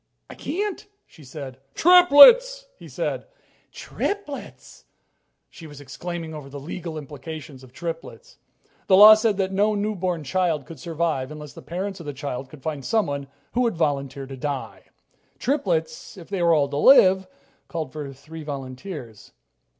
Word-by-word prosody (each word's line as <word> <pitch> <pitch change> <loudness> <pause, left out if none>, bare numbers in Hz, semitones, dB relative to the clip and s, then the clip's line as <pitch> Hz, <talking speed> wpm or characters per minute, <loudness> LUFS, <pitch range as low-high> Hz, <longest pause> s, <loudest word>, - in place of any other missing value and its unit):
"I - - -8
can't," 395 +7 -4 0.2
she 155 - -18
said. 135 -1 -9 0.2
"Triplets!" 360 - +7
he - - -13
said. - - -4 0.4
"Triplets!" 400 -9 -5
she - - -17
said. - - -31 0.6
She 165 - -12
was 145 -2 -12
exclaiming 165 +4 -7
over 150 -3 -9
the 140 +1 -8
legal 165 +2 -7
implications 145 -1 -9
of 130 - -15
triplets. 170 - -8 0.5
The 190 - +5
law 210 +2 +11
said 215 -2 +1
that 190 -1 -1
no 205 +2 +1
newborn 185 -5 -2
child 165 -3 -1
could 160 -1 -11
survive 160 -4 -2
unless 150 -1 -9
the - - -11
parents 190 +3 -5
of 165 - -10
the 145 - -4
child 135 -1 -6
could 140 -3 -14
find 150 -3 -4
someone 145 - -1 0.2
who 245 - 0
would 230 -7 0
volunteer 140 -3 -2
to 135 0 -9
die. 140 0 -5 0.5
Triplets, 175 - -2
if 175 - -12
they 195 -3 -2
were 170 -1 +4
all 145 -2 +2
to 140 - -4
live, 190 - +6 0.4
called 155 -6 -5
for 145 -2 -6
three 160 +4 -11
volunteers. 135 - -8
160 Hz, 160 wpm, -23 LUFS, 140-200 Hz, 0.6 s, law